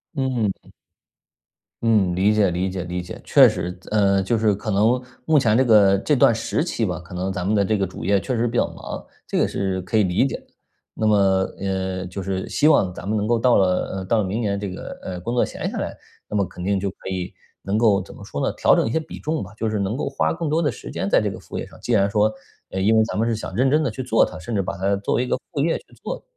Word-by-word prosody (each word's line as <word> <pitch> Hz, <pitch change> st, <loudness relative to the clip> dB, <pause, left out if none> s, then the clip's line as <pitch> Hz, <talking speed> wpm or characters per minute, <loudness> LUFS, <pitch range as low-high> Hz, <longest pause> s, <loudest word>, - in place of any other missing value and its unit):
嗯。 125 Hz, -8 st, -2 dB, 1.1 s
嗯， 105 Hz, -6 st, +3 dB
理 95 Hz, +3 st, +3 dB
解 105 Hz, -3 st, +3 dB
理 90 Hz, +2 st, -1 dB
解 95 Hz, -1 st, -4 dB
理 90 Hz, +1 st, -4 dB
解。 90 Hz, -, -9 dB
确 135 Hz, -4 st, +7 dB
实， 90 Hz, -4 st, -3 dB
自 -, -, -14 dB
呃， 100 Hz, -2 st, +3 dB
就 110 Hz, +4 st, 0 dB
是 110 Hz, -1 st, +3 dB
可 105 Hz, +2 st, -5 dB
能 110 Hz, +5 st, +3 dB, 0.2 s
目 155 Hz, -2 st, +4 dB
前 110 Hz, -3 st, +3 dB
这 130 Hz, -, +4 dB
个 100 Hz, -4 st, +6 dB
这 150 Hz, +9 st, +1 dB
段 135 Hz, -2 st, +5 dB
时 115 Hz, +6 st, -1 dB
期 120 Hz, -10 st, -1 dB
吧， 90 Hz, -3 st, -3 dB
可 85 Hz, -, -15 dB
能 95 Hz, +2 st, -2 dB
咱 100 Hz, -, -3 dB
们 100 Hz, +4 st, +1 dB
的 100 Hz, -1 st, +3 dB
这 110 Hz, -, +1 dB
个 95 Hz, -2 st, 0 dB
主 90 Hz, -, -8 dB
业 100 Hz, +1 st, +3 dB
确 125 Hz, +5 st, -3 dB
实 120 Hz, +1 st, +1 dB
比 115 Hz, -, -4 dB
较 -, -, +3 dB
忙， -, -, -8 dB, 0.2 s
这 -, -, -1 dB
个 -, -, +3 dB
是 95 Hz, -1 st, -2 dB
可 95 Hz, +5 st, -1 dB
以 105 Hz, -, +5 dB
理 90 Hz, +8 st, +2 dB
解 -, -, -4 dB
的。 -, -, -21 dB, 0.5 s
那 110 Hz, -, -1 dB
么， 105 Hz, -, +5 dB, 0.4 s
呃， 95 Hz, -1 st, -2 dB
就 90 Hz, +2 st, -6 dB
是 95 Hz, 0 st, -3 dB
希 150 Hz, -, +2 dB
望 95 Hz, -12 st, +4 dB
咱 90 Hz, -, -8 dB
们 110 Hz, -, +1 dB
能 105 Hz, -, 0 dB
够 120 Hz, 0 st, +2 dB
到 125 Hz, +1 st, +4 dB
了， 95 Hz, 0 st, +1 dB
嗯， 95 Hz, -1 st, -5 dB
到 115 Hz, +1 st, +2 dB
了 -, -, +1 dB
明 95 Hz, +4 st, -2 dB
年 100 Hz, -4 st, -1 dB
这 100 Hz, -2 st, -4 dB
个， 90 Hz, -, -7 dB
呃， 90 Hz, -1 st, -5 dB
工 120 Hz, +6 st, -3 dB
作 125 Hz, -, +3 dB
闲 -, -, -4 dB
下 -, -, -5 dB
来， -, -, -4 dB, 0.3 s
那 105 Hz, -, -2 dB
么 100 Hz, -, +2 dB
肯 90 Hz, -, -9 dB
定 100 Hz, +1 st, +1 dB
就 100 Hz, -, -2 dB
可 95 Hz, -, -9 dB
以 95 Hz, -1 st, -4 dB, 0.3 s
能 100 Hz, +2 st, 0 dB
够 105 Hz, -4 st, +4 dB
怎 -, -, -9 dB
么 -, -, -12 dB
说 -, -, -6 dB
呢， -, -, -1 dB
调 -, -, +4 dB
整 -, -, +2 dB
一 -, -, -2 dB
些 160 Hz, -, +1 dB
比 160 Hz, -, -9 dB
重 155 Hz, +1 st, -2 dB
吧， 95 Hz, -, -8 dB
就 115 Hz, -, -1 dB
是 110 Hz, -1 st, -1 dB
能 100 Hz, +5 st, -1 dB
够 -, -, -2 dB
花 -, -, 0 dB
更 165 Hz, -1 st, -3 dB
多 160 Hz, +2 st, +2 dB
的 145 Hz, -5 st, +1 dB
时 -, -, -9 dB
间 -, -, -2 dB
在 -, -, +5 dB
这 -, -, -1 dB
个 -, -, -8 dB
副 -, -, -8 dB
业 -, -, -3 dB
上， -, -, -16 dB
既 120 Hz, -, -1 dB
然 100 Hz, -2 st, +4 dB
说， 105 Hz, +1 st, +2 dB, 0.4 s
呃， 95 Hz, -, -4 dB
因 105 Hz, +4 st, +3 dB
为 110 Hz, -, +5 dB
咱 -, -, -4 dB
们 115 Hz, +2 st, +1 dB
是 115 Hz, -, +1 dB
想 95 Hz, -, -6 dB
认 130 Hz, +4 st, +2 dB
真 155 Hz, -, +4 dB
地 140 Hz, -, +1 dB
去 125 Hz, +4 st, -5 dB
做 115 Hz, -2 st, +3 dB
它， 90 Hz, -, -3 dB
甚 115 Hz, +6 st, -6 dB
至 100 Hz, -, +1 dB
把 95 Hz, +1 st, -4 dB
它 100 Hz, +1 st, +1 dB
作 100 Hz, -, -1 dB
为 125 Hz, -, +1 dB
一 -, -, -7 dB
个 -, -, +1 dB, 0.2 s
副 150 Hz, -, -4 dB
业 165 Hz, -, +1 dB
去 -, -, -23 dB, 0.2 s
做。 -, -, -5 dB
105 Hz, 310 characters per minute, -22 LUFS, 95-115 Hz, 1.1 s, 确